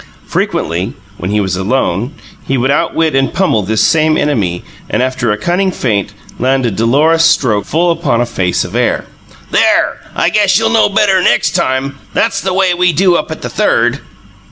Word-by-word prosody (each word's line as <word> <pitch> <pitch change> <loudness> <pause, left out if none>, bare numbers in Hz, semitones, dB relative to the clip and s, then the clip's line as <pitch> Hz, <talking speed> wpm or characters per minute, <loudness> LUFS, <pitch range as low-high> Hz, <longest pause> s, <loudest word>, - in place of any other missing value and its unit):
Frequently, 90 +9 -2 0.2
when 90 - -4
he 105 +1 +1
was 95 -3 -1
alone, 110 - -1 0.3
he 135 - 0
would 130 +2 +1
outwit, 160 +1 0
and 135 0 +1
pummel 175 - +1
this 105 +2 0
same 155 -1 +2
enemy, 100 -12 -1 0.3
and, - - 0
after 130 -3 -1
a 105 - -1
cunning 180 - 0
feint, 105 - -1 0.3
land 130 0 +1
a 115 - 0
dolorous 145 +11 +2
stroke 125 -10 +2
full 170 +3 +1
upon 160 -8 0
a 120 - +1
face 95 -6 -1
of - - -8
air. - - 0 0.5
"There! - - +2 0.2
I - - +2
guess 205 -2 +3
you'll 225 0 +1
know 225 -2 +3
better 200 -2 +2
next - - +2
time. 135 -5 -1 0.2
That's - - 0
the 190 - -2
way 185 -1 +2
we 180 0 +2
do 180 +3 +3
up 155 - -1
at 160 - -7
the - - -2
Third!" 130 - +1
135 Hz, 185 wpm, -13 LUFS, 110-175 Hz, 0.5 s, guess